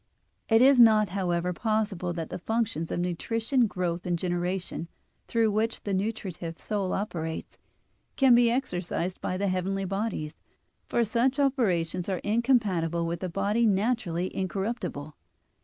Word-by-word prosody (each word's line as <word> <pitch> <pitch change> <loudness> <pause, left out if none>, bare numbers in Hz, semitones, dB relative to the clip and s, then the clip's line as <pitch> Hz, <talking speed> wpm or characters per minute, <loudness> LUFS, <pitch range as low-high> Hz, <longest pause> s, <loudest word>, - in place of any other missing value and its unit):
It 225 +1 +6
is 270 -1 +6
not, 215 -3 +6
however, 180 -2 -1
possible 210 -3 -1
that 165 -2 -5
the - - -4
functions 220 -5 -1
of - - -1
nutrition, 225 +8 0
growth, 180 -3 -2
and 175 -1 +1
generation, 175 0 -2 0.4
through 225 -2 +2
which 220 +2 -1
the 200 - -2
nutritive 190 -5 -3
soul 200 -3 -2
operates, 165 -5 -4 0.6
can 265 -3 +5
be 240 0 +5
exercised 180 -7 -2
by 185 - -2
the 200 +1 0
heavenly 190 +1 -1
bodies, 195 -6 -3 0.6
for 235 - +2
such 240 +5 +1
operations 185 - +1
are 190 - 0
incompatible 205 -8 +1
with 170 0 -3
a 185 - -2
body 205 +6 +1
naturally 195 -4 0
incorruptible. 190 -6 -3
195 Hz, 140 wpm, -27 LUFS, 175-225 Hz, 0.6 s, It